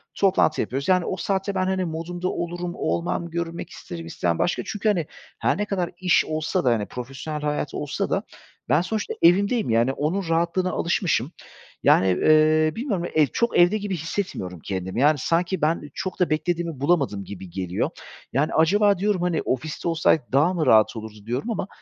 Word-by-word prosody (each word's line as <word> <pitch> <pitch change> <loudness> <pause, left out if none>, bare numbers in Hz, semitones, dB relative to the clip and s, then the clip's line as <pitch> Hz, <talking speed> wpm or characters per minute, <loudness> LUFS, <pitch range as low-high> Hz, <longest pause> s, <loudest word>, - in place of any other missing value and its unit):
Toplantı 190 -5 +3
yapıyoruz, 135 +5 -3
yani, 185 -2 +3
o 185 - -3
saatte 195 +2 -1
ben, 185 0 +1
hani, 190 -1 0
modumda 175 +2 -4
olurum, 175 0 -4
olmam, 170 0 -2
görünmek 170 0 -4
isterim 85 -1 -8
istemem 85 0 -1
başka 175 - 0
çünkü, 215 +1 -1
hani, 175 -7 +1 0.3
her - - +1
ne 210 - -1
kadar 185 -4 -2
iş 180 -1 +3
olsa 155 +4 -1
da, 120 - +4
hani, 110 -3 0
profesyonel 135 +5 -6
hayat 150 -1 -2
olsa 145 -1 -3
da - - 0 0.5
ben 150 +6 +4
sonuçta 215 +3 -3
evimdeyim, 200 - +4
yani, 115 +3 +3
onun 165 +6 -2
rahatlığına 170 +2 +1
alışmışım. 170 - 0 0.5
Yani, 95 - +5
eee, 155 +10 +4
bilmiyorum 210 -9 -2
ya - - -6
ev 150 -2 +5
çok 235 0 +1
evde 175 +5 +5
gibi 200 -2 -3
hissetmiyorum 155 - -4
kendimi. 95 +5 -3
Yani, 150 +1 +5
sanki 170 +6 0
ben 160 +2 +1
çok 185 +1 -5
da 180 - +2
beklediğimi 165 -1 -1
bulamadım 140 - +1
gibi 95 -2 -9
geliyor. 90 0 -2 0.4
Yani, 145 +4 +1
acaba 200 +5 +4
diyorum, 200 -1 0
hani, 175 -3 0
ofiste 150 +6 -3
olsaydık 160 -4 +2
daha 150 +7 +3
mı 165 -4 0
rahat 110 +1 +5
olurdu 110 -2 -9
diyorum 125 - -2
ama 200 -3 -3
165 Hz, 180 wpm, -24 LUFS, 135-185 Hz, 0.5 s, Yani